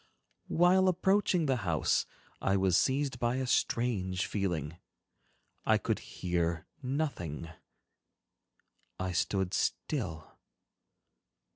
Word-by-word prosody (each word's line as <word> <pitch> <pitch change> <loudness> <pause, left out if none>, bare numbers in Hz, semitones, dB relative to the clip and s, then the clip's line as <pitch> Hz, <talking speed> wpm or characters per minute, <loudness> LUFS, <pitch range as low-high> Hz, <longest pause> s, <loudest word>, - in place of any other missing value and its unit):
While 180 +2 +4
approaching 185 -1 +2
the 135 -3 +2
house, 85 -8 +1 0.3
I 95 0 +2
was 95 -2 +3
seized 135 +1 +1
by 120 0 +1
a 130 0 -1
strange 100 -6 0
feeling. 85 -7 -2 0.9
I - - +4
could - - -1
hear 85 -2 -2 0.2
nothing, 125 - -3 1.5
I 95 0 -1
stood 90 +2 0
still. 80 0 -2
100 Hz, 95 wpm, -31 LUFS, 85-135 Hz, 1.5 s, While